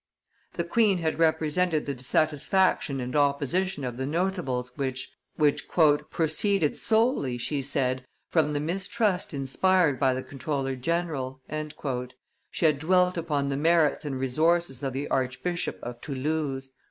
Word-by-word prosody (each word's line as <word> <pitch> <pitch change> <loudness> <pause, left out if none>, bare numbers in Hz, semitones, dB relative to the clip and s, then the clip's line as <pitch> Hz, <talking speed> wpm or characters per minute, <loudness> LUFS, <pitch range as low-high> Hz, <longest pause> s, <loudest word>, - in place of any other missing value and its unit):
The 170 - -1
queen 200 +2 +3
had 160 -2 -2
represented 160 0 +2
the 140 - -2
dissatisfaction 150 +3 +1
and 125 +1 -4
opposition 145 +4 +1
of 125 -2 -4
the 130 +1 -2
notables, 155 -7 -1
which 130 -2 -3 1.0
"proceeded 165 +1 +1
solely," 220 - +2
she 140 +4 -2
said, 130 -2 -1 0.2
"from 150 -3 +1
the 145 - 0
mistrust 190 +4 -1
inspired 145 +3 +2
by 130 -2 +3
the 130 - -4
comptroller 135 -1 -3
general;" 135 -2 -2 1.1
she - - -1
had 150 -3 +3
dwelt 180 +3 +3
upon 150 -5 -1
the 135 - -1
merits 160 0 +3
and 135 -3 -3
resources 155 +2 +1
of 135 -2 -2
the 135 +2 -3
Archbishop 135 +7 -1
of 120 0 -7
Toulouse. 140 -1 -3
150 Hz, 130 wpm, -27 LUFS, 135-170 Hz, 1.1 s, queen